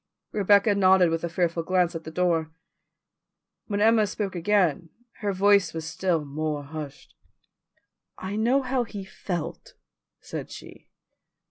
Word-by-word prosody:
Rebecca 205 Hz, 0 st, +4 dB
nodded 190 Hz, -3 st, +4 dB
with 165 Hz, 0 st, -2 dB
a 170 Hz, -, -1 dB
fearful 170 Hz, -1 st, 0 dB
glance 180 Hz, +1 st, +1 dB
at 165 Hz, -1 st, -7 dB
the -, -, -5 dB
door. 165 Hz, -1 st, 0 dB, 1.2 s
When 205 Hz, -1 st, -1 dB
Emma 220 Hz, -1 st, +4 dB
spoke 200 Hz, -1 st, -3 dB
again 175 Hz, -3 st, +1 dB, 0.3 s
her 205 Hz, -1 st, -1 dB
voice 195 Hz, -3 st, +3 dB
was 160 Hz, -1 st, -4 dB
still 165 Hz, -1 st, -1 dB
more 150 Hz, +1 st, -3 dB
hushed. 145 Hz, -1 st, -9 dB, 1.0 s
"I 190 Hz, +2 st, -5 dB
know 245 Hz, +6 st, +2 dB
how 255 Hz, -1 st, 0 dB
he 205 Hz, -4 st, -8 dB
felt," 190 Hz, -, -6 dB, 0.4 s
said -, -, -7 dB
she. -, -, -12 dB
185 Hz, 135 wpm, -26 LUFS, 165-205 Hz, 1.2 s, Rebecca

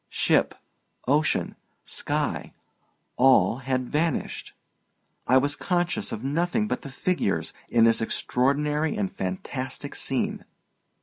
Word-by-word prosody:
Ship, -, -, +2 dB, 0.5 s
ocean, 150 Hz, +3 st, +1 dB, 0.3 s
sky—all 125 Hz, -5 st, 0 dB
had 130 Hz, -1 st, -2 dB
vanished. 155 Hz, +1 st, -1 dB, 0.7 s
I 130 Hz, -, +6 dB
was 145 Hz, +2 st, +2 dB
conscious 180 Hz, +3 st, -1 dB
of 110 Hz, -, -5 dB
nothing 175 Hz, +10 st, 0 dB
but -, -, -2 dB
the 140 Hz, -, -8 dB
figures 135 Hz, -, -1 dB, 0.2 s
in 115 Hz, -1 st, +4 dB
this 115 Hz, 0 st, +4 dB
extraordinary 145 Hz, +6 st, 0 dB
and 100 Hz, -2 st, -2 dB
fantastic 110 Hz, +8 st, -4 dB
scene. -, -, -2 dB
135 Hz, 105 wpm, -26 LUFS, 125-160 Hz, 0.7 s, I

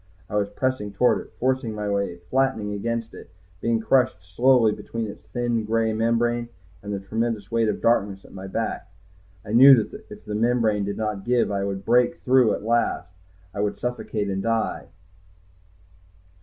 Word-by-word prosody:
I -, -, -3 dB
was 100 Hz, -1 st, +1 dB
pressing 115 Hz, -1 st, -2 dB
toward 125 Hz, +5 st, +2 dB
it, -, -, -15 dB
forcing 130 Hz, -3 st, 0 dB
my 105 Hz, -1 st, -3 dB
way, 100 Hz, -3 st, -1 dB
flattened 130 Hz, -6 st, +1 dB
against 115 Hz, +2 st, -3 dB
it, -, -, -12 dB, 0.3 s
being 115 Hz, -1 st, +1 dB
crushed 125 Hz, -2 st, +2 dB
slowly 115 Hz, +5 st, +3 dB
between 115 Hz, +2 st, -5 dB
this 105 Hz, -, -10 dB
thin, 120 Hz, -2 st, -1 dB
gray 110 Hz, 0 st, 0 dB
membrane 120 Hz, +1 st, 0 dB, 0.3 s
and 105 Hz, -, -6 dB
the 100 Hz, -, -2 dB
tremendous 110 Hz, 0 st, -3 dB
weight 115 Hz, -1 st, +2 dB
of 105 Hz, -, -3 dB
darkness 100 Hz, -4 st, +1 dB
at -, -, -15 dB
my 95 Hz, 0 st, -8 dB
back. 100 Hz, -2 st, -4 dB, 0.5 s
I 105 Hz, -, -5 dB
knew 135 Hz, +3 st, +9 dB
that 110 Hz, -4 st, -4 dB
if 105 Hz, 0 st, -12 dB
the 105 Hz, -, -5 dB
membrane 110 Hz, -2 st, +1 dB
did 100 Hz, -, -4 dB
not 105 Hz, -3 st, -3 dB
give, 120 Hz, -1 st, +2 dB
if -, -, -4 dB
I 100 Hz, -, -1 dB
did 100 Hz, -, -1 dB
not 95 Hz, 0 st, -7 dB
break 120 Hz, +1 st, +3 dB
through 125 Hz, -3 st, +4 dB
at -, -, -8 dB
last, 115 Hz, -6 st, 0 dB, 0.4 s
I 100 Hz, -, -6 dB
would 105 Hz, 0 st, -1 dB
suffocate 110 Hz, -2 st, -3 dB
and 95 Hz, -1 st, -2 dB
die. 115 Hz, +1 st, -1 dB
110 Hz, 185 wpm, -24 LUFS, 100-120 Hz, 0.5 s, knew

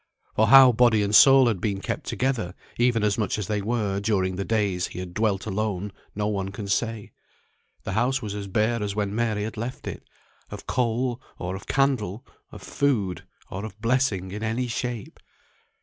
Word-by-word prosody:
For 110 Hz, -, +3 dB
how 135 Hz, -1 st, +9 dB
body 115 Hz, -2 st, +4 dB
and 100 Hz, +1 st, -2 dB
soul 135 Hz, +3 st, +8 dB
had 110 Hz, -7 st, 0 dB
been 100 Hz, -3 st, -1 dB
kept -, -, -4 dB
together, 125 Hz, -9 st, -1 dB, 0.2 s
even 120 Hz, -2 st, +3 dB
as 105 Hz, +1 st, +1 dB
much 110 Hz, +1 st, 0 dB
as 105 Hz, -, -3 dB
they 105 Hz, 0 st, -1 dB
were, 105 Hz, -2 st, -1 dB
during 95 Hz, -3 st, 0 dB
the 100 Hz, -, -2 dB
days 100 Hz, -5 st, 0 dB
he -, -, -11 dB
had 90 Hz, -1 st, -7 dB
dwelt 100 Hz, -2 st, 0 dB
alone, 105 Hz, -1 st, -2 dB, 0.2 s
no 105 Hz, 0 st, -1 dB
one 100 Hz, -2 st, -1 dB
can 100 Hz, +1 st, -7 dB
say. 110 Hz, +1 st, -2 dB, 0.7 s
The -, -, -4 dB
house 125 Hz, +6 st, +1 dB
was 105 Hz, -3 st, -5 dB
bare 110 Hz, +4 st, +1 dB
as 100 Hz, -1 st, -3 dB
when 100 Hz, -1 st, -1 dB
Mary 110 Hz, -2 st, 0 dB
had 110 Hz, +1 st, -5 dB
left 120 Hz, +3 st, -5 dB
it, -, -, -5 dB, 0.5 s
of -, -, -9 dB
coal, 125 Hz, 0 st, -1 dB, 0.2 s
or 90 Hz, +1 st, -4 dB
of 95 Hz, -, -10 dB
candle, 125 Hz, -7 st, 0 dB, 0.3 s
of -, -, -11 dB
food, 100 Hz, -, -1 dB, 0.3 s
or 100 Hz, +1 st, -5 dB
of 105 Hz, -2 st, -8 dB
blessing 115 Hz, -6 st, 0 dB
in 105 Hz, +2 st, -6 dB
any 115 Hz, +3 st, -1 dB
shape. 120 Hz, -2 st, -4 dB
105 Hz, 185 wpm, -25 LUFS, 100-120 Hz, 0.7 s, how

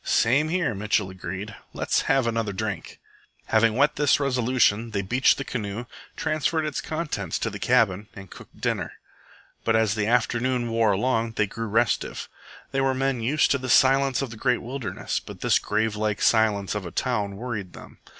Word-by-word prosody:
"Same 140 Hz, +7 st, +2 dB
here," 175 Hz, -7 st, 0 dB
Mitchell 105 Hz, -1 st, 0 dB
agreed. 95 Hz, +3 st, -6 dB, 0.2 s
"Let's -, -, 0 dB
have 135 Hz, -2 st, +3 dB
another 115 Hz, -3 st, -1 dB
drink." 100 Hz, -4 st, -5 dB, 0.5 s
Having 110 Hz, 0 st, +3 dB
wet 140 Hz, +4 st, +2 dB
this 145 Hz, -2 st, +3 dB
resolution, 125 Hz, -4 st, +2 dB
they 100 Hz, -2 st, -2 dB
beached 125 Hz, +7 st, +3 dB
the 135 Hz, -, -3 dB
canoe, 110 Hz, -2 st, -4 dB, 0.3 s
transferred 155 Hz, +1 st, 0 dB
its 140 Hz, -3 st, -3 dB
contents 160 Hz, +3 st, -3 dB
to -, -, -2 dB
their -, -, -7 dB
cabin, 105 Hz, -5 st, +2 dB
and 95 Hz, -1 st, -11 dB
cooked -, -, -14 dB
dinner. -, -, -2 dB, 0.7 s
But 115 Hz, -, +2 dB
as 110 Hz, -2 st, +3 dB
the 105 Hz, -1 st, -1 dB
afternoon 120 Hz, +1 st, +1 dB
wore 115 Hz, -2 st, +3 dB
along 115 Hz, +2 st, 0 dB
they 105 Hz, -, +1 dB
grew 115 Hz, +3 st, -5 dB
restive. 115 Hz, +2 st, 0 dB, 0.4 s
They 135 Hz, -, 0 dB
were 135 Hz, -1 st, +1 dB
men 135 Hz, -2 st, 0 dB
used 140 Hz, +7 st, +2 dB
to 140 Hz, -, +2 dB
the 130 Hz, 0 st, -5 dB
silence 135 Hz, +1 st, +4 dB
of 130 Hz, -, -5 dB
the 115 Hz, -, -9 dB
great 125 Hz, +1 st, 0 dB
wilderness, 120 Hz, -6 st, -3 dB
but -, -, -11 dB
this -, -, +3 dB
gravelike 105 Hz, -1 st, -1 dB
silence 105 Hz, -3 st, +2 dB
of 105 Hz, -2 st, -3 dB
a 85 Hz, -, -6 dB
town 105 Hz, -6 st, -1 dB
worried 105 Hz, -5 st, -5 dB
them. -, -, -13 dB
115 Hz, 180 wpm, -25 LUFS, 105-130 Hz, 0.7 s, silence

